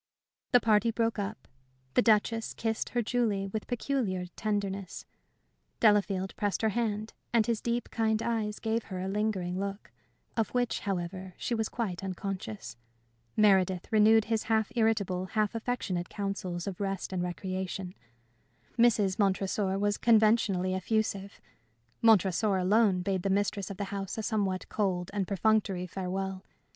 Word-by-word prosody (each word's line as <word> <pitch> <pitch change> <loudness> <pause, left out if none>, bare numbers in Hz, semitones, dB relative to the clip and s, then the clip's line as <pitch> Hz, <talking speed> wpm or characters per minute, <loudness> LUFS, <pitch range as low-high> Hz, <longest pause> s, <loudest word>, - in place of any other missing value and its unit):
The 245 - +7
party 220 0 +3
broke 225 -1 0
up. 205 +2 -5 0.5
The - - +5
Duchess 225 0 +2
kissed 225 -1 -2
her 240 -1 0
Julie 220 -4 0
with 210 +2 -4
peculiar 240 -7 -1
tenderness; 200 -3 -3 0.7
Delafield 200 -3 +3
pressed 205 0 -1
her 220 - +4
hand, 215 -1 -2 0.2
and 230 -2 +4
his 230 -2 -1
deep, 235 +1 -2
kind 220 -1 +1
eyes 220 -3 -1
gave 225 +1 -1
her 185 -3 -5
a 185 - -3
lingering 190 -3 -1
look, 200 +1 -5 0.4
of 225 -3 +1
which, 245 -1 +1
however, 185 -1 -4
she - - -2
was 220 -1 0
quite 195 -6 -3
unconscious; 185 - -5 0.6
Meredith 190 -4 +3
renewed 220 0 +5
his 225 -1 -1
half 220 -2 +1
irritable, 205 -5 +1
half 210 +2 0
affectionate 225 -7 -2
counsels 190 -4 -3
of 195 -1 -5
rest 195 -1 -3
and 180 - -1
recreation; 185 +1 -4 0.9
Mrs. 215 -5 +4
Montresor 195 0 +1
was 205 +1 0
conventionally 215 -5 +3
effusive; 200 0 -1 0.6
Montresor 205 -2 +4
alone 190 0 +3
bade 190 -1 0
the 195 - -1
mistress 200 0 0
of 200 - -6
the 205 - -2
house 195 0 -4
a 220 - -2
somewhat 200 -4 -1
cold 185 -4 -1
and 200 -3 -1
perfunctory 200 -2 +1
farewell. 190 +1 -4
200 Hz, 145 wpm, -30 LUFS, 190-220 Hz, 0.9 s, The